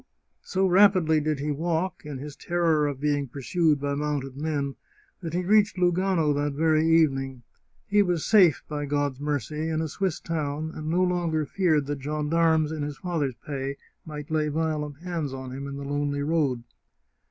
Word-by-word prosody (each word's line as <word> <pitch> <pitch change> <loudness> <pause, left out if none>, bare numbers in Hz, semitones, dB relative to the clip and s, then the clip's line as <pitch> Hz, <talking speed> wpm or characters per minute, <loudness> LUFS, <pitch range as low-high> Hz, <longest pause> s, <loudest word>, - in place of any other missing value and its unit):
So 190 +1 0
rapidly 185 -4 +5
did 150 0 -1
he 150 +2 -1
walk, 165 +2 -2
in 145 -3 -5
his 145 +2 -8
terror 165 -4 +1
of 140 -2 -4
being 145 -1 0
pursued 150 +4 +1
by 140 0 -1
mounted 140 -2 -2
men, 145 -2 -2 0.5
that 165 -2 -4
he 180 - 0
reached 205 0 +4
Lugano 180 -3 +2
that 145 0 -1
very 155 +1 +2
evening. 135 -6 +2 0.4
He 205 +1 +3
was 175 -5 0
safe, 185 -8 +5
by 145 -1 -4
God's 145 -2 -1
mercy, 150 +2 -2
in 160 -1 -1
a 160 - -1
Swiss 185 +2 -2
town, 155 -1 -3
and 155 0 -5
no 180 +3 +2
longer 170 -4 0
feared 155 -5 +1
that 145 -1 -4
gendarmes 155 +2 +1
in 155 -1 -4
his 145 -1 -4
father's 150 -5 -2
pay 140 -1 -4 0.3
might 150 -1 -8
lay 155 -1 +1
violent 150 -2 -2
hands 165 -7 -3
on 130 -1 -7
him 135 +2 -6
in 140 0 -6
the 140 - -6
lonely 145 0 -1
road. 145 -6 0
150 Hz, 175 wpm, -26 LUFS, 145-165 Hz, 0.5 s, rapidly